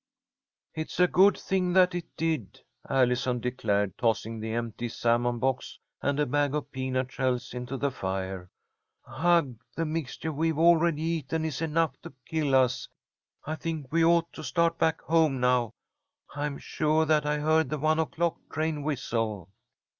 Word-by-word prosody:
"It's 155 +2 -5
a 180 - +7
good 195 +3 +5
thing 185 -2 0
that 185 -1 +5
it 175 -2 -4
did," 160 - -2 0.3
Allison 125 -1 +2
declared, 105 -5 -1
tossing 115 -1 0
the 110 +1 -4
empty 115 +1 -3
salmon 120 +1 +1
box 130 +2 -2 0.2
and 140 +1 0
a 150 - +3
bag 145 +2 +1
of 150 - -4
peanut 130 -1 -2
shells 130 -3 -1
into 125 +2 -5
the 140 +1 0
fire. 95 -4 -4 0.6
"Ugh! 145 -3 +1 0.2
The 165 - -1
mixture 160 0 -3
we've 160 +1 0
already 165 -1 +4
eaten 160 -1 -1
is 155 -2 -3
enough 165 0 0
to - - -10
kill 150 -4 0
us! 130 -2 +2 0.6
I 155 - -3
think 160 -4 -5
we 165 +1 +3
ought 170 0 +3
to 155 - -8
start 165 +5 +1
back 160 0 +1
home 160 -5 +2
now. 125 -2 +2 0.6
I'm 145 0 -3
sure 155 +1 +1
that 150 -1 +2
I 150 0 +1
heard 155 -1 +2
the 150 - -2
one 155 +2 +2
o'clock 165 +1 -1
train 155 -1 -1
whistle." 115 - -2
145 Hz, 160 wpm, -28 LUFS, 125-160 Hz, 0.6 s, a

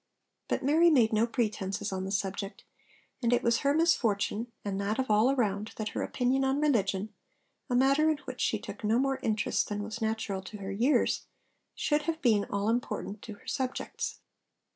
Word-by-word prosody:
But - - -1
Mary 320 +5 +5
made 240 -8 +4
no 220 +2 +3
pretences 210 -5 -2
on 190 0 -3
the 190 - -4
subject, 195 +1 -3 0.6
and 235 -1 +2
it 245 - +3
was 235 -1 +3
her 280 - +2
misfortune, 235 -8 +1
and 200 -1 -2
that 205 +2 -1
of 260 -4 0
all 215 +4 +5
around, 215 -5 0
that 215 -1 -3
her - - -3
opinion 260 +2 +1
on 270 +1 +1
religion 215 -8 +1 0.6
a 245 - +1
matter 275 +5 +4
in 310 - +1
which - - -6
she - - +2
took - - -9
no 215 +2 +3
more 270 +1 +1
interest 215 -4 0
than 205 0 -2
was 220 +2 -6
natural 220 -3 -1
to 190 +3 -9
her 195 -1 -5
years 240 +9 +2 0.5
should 300 0 +1
have 320 -1 -1
been 220 -8 +3
all 200 +1 -2
important 225 -3 -2
to 215 - -8
her - - -21
subjects. 260 -1 -3
225 Hz, 185 wpm, -30 LUFS, 205-265 Hz, 0.6 s, Mary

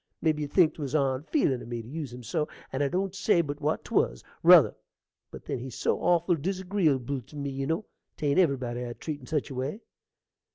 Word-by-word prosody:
Mebby 155 -2 +1
you 145 - -2
think 160 +1 +4
'twas 145 -2 -4
onfeelin' 135 - +1
in - - -10
me 120 -1 -4
to - - -12
use 145 -1 -5
him 125 0 -9
so, 150 +7 -1 0.3
and 135 - -1
I 140 - +3
don't 185 +4 -1
say 195 -2 +3
but 145 -2 -5
what 155 +1 -1
'twas, - - 0 0.2
ruther; - - +8 0.6
but - - -11
then - - -3
he's 125 -1 -7
so - - 0
awful 175 0 +3
dizagreeable 160 -7 0
tew 150 - -13
me, 140 -1 -3
you 135 0 -3
know: 165 +7 -1 0.3
'tain't 145 +2 +2
everybody 130 -7 +1
I'd 120 -1 -7
treat 150 -3 -4
in 125 - -14
such 150 -2 -1
a - - -4
way. 135 - -3
145 Hz, 210 wpm, -28 LUFS, 130-165 Hz, 0.6 s, ruther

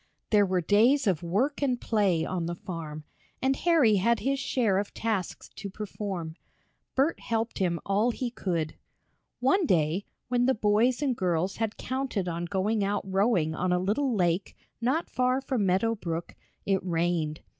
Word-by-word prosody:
There 205 -2 +5
were 185 -1 +1
days 230 - +4
of 180 -6 +1
work 220 - 0
and 255 -4 +1
play 200 -9 +1
on 175 -3 -2
the 175 - -3
farm, 160 -4 -7 0.4
and 265 +1 +2
Harry 290 -13 +4
had 235 +5 +2
his 275 +1 0
share 220 -8 +1
of 205 - -5
tasks 215 -6 -2
to 200 - -5
perform. 190 -5 -5 0.6
Bert 280 +5 +2
helped 225 0 -2
him 175 -3 +1
all 205 +4 +2
he 245 0 -3
could. 170 -9 -2 0.7
One 315 +7 +3
day, 165 - +1 0.2
when 245 0 +2
the 265 - +3
boys 225 +6 +2
and 265 -4 +1
girls 180 -1 0
had 220 -1 -2
counted 255 -7 -2
on 170 0 -2
going 205 +3 0
out 200 +1 0
rowing 190 -4 +2
on 180 +3 -1
a 180 - +3
little 220 +8 0
lake 175 -1 0 0.2
not 270 +8 +1
far 255 +1 +1
from 255 -7 -1
Meadow 195 +5 +2
Brook, 170 -5 -4 0.3
it 195 -2 +1
rained. 165 -3 -1
205 Hz, 165 wpm, -28 LUFS, 180-245 Hz, 0.7 s, There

